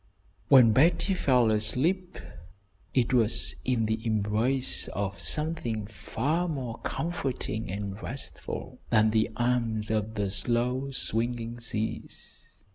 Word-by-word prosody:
When 125 -4 +7
Betty 165 - +3
fell 125 -10 +3
asleep 150 - +1 0.7
it 125 -1 +1
was 115 -1 +2
in 120 -3 +1
the 110 +1 -2
embrace 110 +4 +1
of 100 0 -4
something 150 -9 +2
far 140 - -2
more 130 -8 -4
comforting 135 -9 -3
and 100 +1 -5
restful 135 +4 -7
than 110 -1 +4
the 110 +1 +2
"arms 115 -3 0
of 110 0 -1
the 100 -2 -1
slow 125 +5 +1
swinging 120 -2 -2
seas." 110 -2 -5
115 Hz, 115 wpm, -28 LUFS, 110-135 Hz, 0.7 s, When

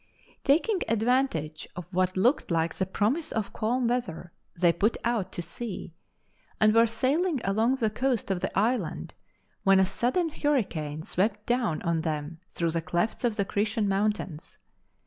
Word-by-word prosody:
Taking 345 +9 +3
advantage 225 - 0
of 180 - -6
what 185 0 0
looked 245 +10 +2
like 165 -1 +1
the 190 - -2
promise 255 - 0
of 220 -3 -2
calm 240 +3 0
weather, 210 -8 -2 0.3
they 170 -1 +5
put 210 +7 +1
out 235 -5 0
to 175 - -3
sea, 185 0 -6 0.7
and 215 0 +5
were 230 +1 +6
sailing 280 +8 +1
along 220 +6 +2
the 225 -5 0
coast 245 -2 0
of 185 - 0
the - - -3
island 200 - 0 0.5
when 195 0 +5
a 190 - +5
sudden 255 - 0
hurricane 185 - -1
swept 205 +4 -1
down 240 -9 0
on 170 -1 +1
them 155 0 -3
through 170 -1 -1
the 165 0 -1
clefts 175 +9 -1
of 235 -3 +1
the 200 - 0
Cretan 210 +1 0
Mountains. 195 -5 -2
210 Hz, 160 wpm, -27 LUFS, 175-245 Hz, 0.7 s, were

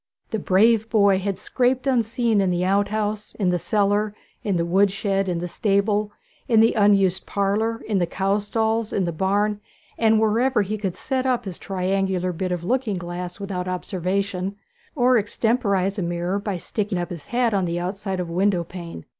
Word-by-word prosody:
The 220 - -1
brave 220 +4 +3
boy 200 -4 +4
had 195 0 -2
scraped 255 +4 0
unseen 235 -4 +2
in 190 - +1
the 180 0 0
out 200 +2 +2
house, 210 0 -3
in 190 -4 +1
the 175 - 0
cellar, 205 +2 +1 0.3
in 200 -4 0
the 170 - 0
wood 195 +4 +3
shed, 195 -1 -1
in 175 - -1
the 175 +1 -3
stable, 205 +2 +1 0.4
in 230 -4 +4
the 225 +1 +5
unused 200 -3 +3
parlour, 210 +3 0
in 205 -3 +1
the 175 - +1
cow 195 +4 0
stalls, 220 +1 -1
in 190 - 0
the 170 - -1
barn, 205 +4 0 0.4
and 220 -1 +4
wherever 225 +2 +2
he 205 +2 -3
could 190 -4 -3
set 265 -1 -1
up 245 -2 0
his 185 -3 -7
triangular 190 -1 -1
bit 180 +2 -3
of 175 -1 -2
looking 235 -1 0
glass 175 +1 -6
without 190 -2 -4
observation, 185 +1 -2 0.4
or 250 -3 +4
extemporize 205 -2 0
a - - -1
mirror 175 +3 -1
by 200 -2 -3
sticking 205 +2 -3
up 175 0 -3
his 170 -4 -8
hat 240 -2 +1
on 195 -2 +1
the 170 0 -2
outside 190 +1 -3
of 180 - -2
a 170 - -7
window 185 -1 +2
pane. 170 - -9
200 Hz, 190 wpm, -23 LUFS, 185-220 Hz, 0.4 s, the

